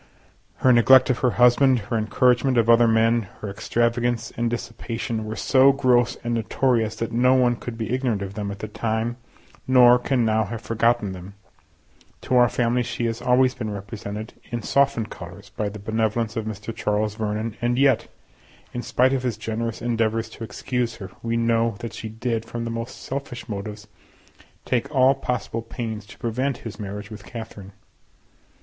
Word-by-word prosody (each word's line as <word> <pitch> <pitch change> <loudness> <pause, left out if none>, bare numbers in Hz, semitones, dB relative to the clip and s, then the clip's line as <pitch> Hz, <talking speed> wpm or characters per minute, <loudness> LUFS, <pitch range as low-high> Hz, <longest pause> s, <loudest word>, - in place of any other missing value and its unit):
Her 130 - +7
neglect 130 +2 +6
of 125 - -1
her 125 - +3
husband, 125 +2 +5
her 115 +2 -4
encouragement 125 +3 +2
of 115 0 +5
other 115 0 +6
men, 115 -1 +3
her 105 - -4
extravagance 120 +2 0
and 120 0 0
dissipation, 115 -1 -4
were 110 +1 -4
so 135 +5 +5
gross 125 -3 +2
and 120 0 -1
notorious 115 -1 +1
that 115 - -4
no 125 +2 +4
one 125 -2 +3
could 120 0 -7
be 110 0 -3
ignorant 125 -6 0
of 100 0 -6
them 100 -1 -4
at 100 - -6
the 110 - -6
time, 110 +2 -2 0.5
nor 125 -1 +7
can 125 -1 +1
now 110 0 +2
have 110 +3 -5
forgotten 115 -2 +1
them. 95 +2 -9 0.9
To 130 - -1
our 120 -1 +6
family 120 +1 +1
she 120 0 -3
has 115 0 -2
always 125 +1 +3
been 115 -5 -5
represented 105 +1 -6 0.2
in 120 -1 -4
softened 140 -5 +1
colours - - -10
by 105 -1 -2
the 105 - -8
benevolence 110 +2 -1
of 110 -2 -2
Mr. 110 +1 -6
Charles 105 -1 0
Vernon, 110 0 -3
and 120 +1 +1
yet, 135 0 +3 0.7
in 120 - -3
spite 130 +2 +2
of 135 - 0
his 125 -4 -2
generous 115 +1 -4
endeavours 115 -1 0
to 115 - -9
excuse 120 +2 -2
her, 95 -2 -9
we 115 0 -1
know 115 -1 +1
that 115 0 -7
she 110 - -6
did, 115 0 -2
from 115 +1 -5
the 115 - -3
most 115 +2 -5
selfish 135 -3 -5
motives, 105 -1 -6 0.8
take 125 +2 0
all 135 -2 +4
possible 125 -3 -3
pains 115 -2 -6
to - - -13
prevent 125 +3 -1
his 110 -2 -7
marriage 105 +1 -6
with 110 - -9
Catherine. 105 -4 -9
115 Hz, 180 wpm, -23 LUFS, 110-125 Hz, 0.9 s, Her